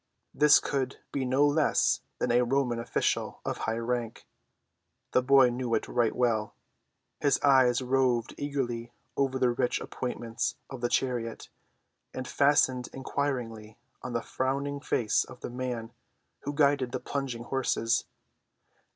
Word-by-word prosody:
This 150 0 +6
could 135 -2 -2
be 135 -2 -1
no 130 +3 +3
less 145 +1 +2 0.2
than - - 0
a 120 +1 +4
Roman 125 -1 +1
official 115 - -1
of - - -3
high 115 - -1
rank; 115 -1 -3 0.9
the 125 - +4
boy 130 -1 +5
knew 120 -1 -1
it - - -2
right 120 -2 +1
well; 115 -4 0 0.6
his 145 -2 +2
eyes 130 -3 +4
roved 125 -2 +1
eagerly 120 -5 -3 0.2
over 135 -1 +1
the 125 -2 +3
rich 125 +1 0
appointments 120 -1 -3 0.2
of 130 -3 -7
the 120 - 0
chariot, 120 -4 -1 0.7
and 130 -1 -4
fastened 130 -3 +2
inquiringly 120 -6 -3 0.2
on 125 - -6
the 120 - -1
frowning 140 +2 -2
face 120 -6 +1
of 125 - -13
the - - -5
man 120 -2 -4 0.5
who 145 - -5
guided 140 -4 +2
the 130 - -1
plunging 130 -5 -4
horses. 120 -2 0
125 Hz, 140 wpm, -29 LUFS, 120-135 Hz, 0.9 s, This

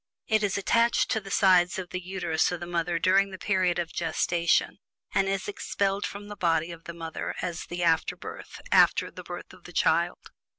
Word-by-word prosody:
It 220 -1 +2
is 205 -1 0
attached 230 +4 +2
to 220 - +2
the 195 - -10
sides 185 -3 +4
of 185 -2 -5
the 185 - -3
Uterus 175 -3 0
of 175 - -3
the 175 - -5
mother 175 0 -1
during 195 +3 +3
the 190 - -8
period 185 -3 +1
of 170 -2 -3
gestation, 170 0 +1 0.3
and 195 0 +2
is 195 -1 -2
expelled 200 -1 -1
from 205 +1 -8
the 205 - -7
body 165 -2 +1
of 165 -1 -11
the 170 - -6
mother, 165 -1 -5
as 175 -1 -4
"the 175 0 -3
afterbirth," 165 -1 -1
after - - +4
the - - -9
birth - - -8
of - - -18
the - - -11
child. - - +1
180 Hz, 200 wpm, -27 LUFS, 170-195 Hz, 0.3 s, sides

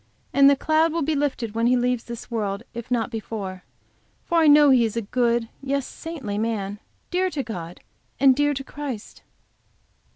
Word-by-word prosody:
And 275 0 +7
the 280 - +5
cloud 315 +3 +2
will 330 0 -1
be 315 +3 0
lifted 275 -6 -1
when 230 +1 +1
he 250 +1 +4
leaves 245 -1 0
this 235 0 -8
world, 205 -2 -2
if 235 -1 -7
not 240 -1 0
before. 205 -4 -5 0.6
For 340 -1 +2
I 320 - +4
know 295 -1 +7
he 250 -3 +5
is 225 0 -2
a 230 - -1
good, 235 +1 +1
yes, 275 -1 -1
a - - -12
saintly 270 -12 -5
man, 210 -3 -2 0.3
dear 370 +1 +1
to 220 - -5 0.4
and 265 -1 +6
dear 290 +1 +2
to 270 - -4
Christ. 270 -6 -7
250 Hz, 185 wpm, -24 LUFS, 225-290 Hz, 0.6 s, And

